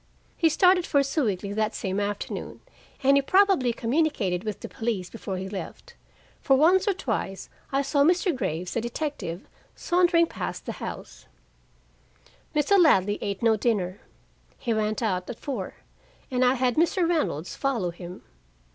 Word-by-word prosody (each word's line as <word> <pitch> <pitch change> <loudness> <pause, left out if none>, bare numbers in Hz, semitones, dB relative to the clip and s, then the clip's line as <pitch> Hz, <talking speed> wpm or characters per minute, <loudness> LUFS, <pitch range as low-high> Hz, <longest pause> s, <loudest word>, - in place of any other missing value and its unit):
He 330 - +3
started 360 +2 +4
for 280 -2 +3
Sewickley 215 - -1
that 215 0 -1
same 190 +1 -2
afternoon, 205 0 -4 0.4
and 275 +1 +5
he - - +4
probably 370 -5 +3
communicated 230 - 0
with 215 -3 -4
the - - -5
police 220 -7 -3
before 200 -4 -5
he 190 +1 -4
left. 205 - -8 0.5
For 270 - +4
once 360 +8 +4
or 405 - +3
twice 210 - -3 0.2
I 275 +1 +1
saw 280 +1 +1
Mr. 350 +1 +2
Graves, 180 -6 -3
the 230 - 0
detective, 235 - -4 0.3
sauntering 350 -1 +3
past - - -6
the - - -3
house. - - -8 1.3
Mr. 300 +7 +4
Ladley 205 - +4
ate 200 +1 -3
no 225 -1 +5
dinner. 200 -4 -1 0.6
He 235 -3 -1
went 215 +1 -1
out 185 -4 -1
at 240 - -6
four, 240 -10 -5 0.6
and 255 0 +2
I 250 +1 +4
had 250 0 0
Mr. 340 +2 +2
Reynolds 185 - -1
follow 235 -11 -1
him. 175 +1 -10
240 Hz, 155 wpm, -26 LUFS, 200-310 Hz, 1.3 s, and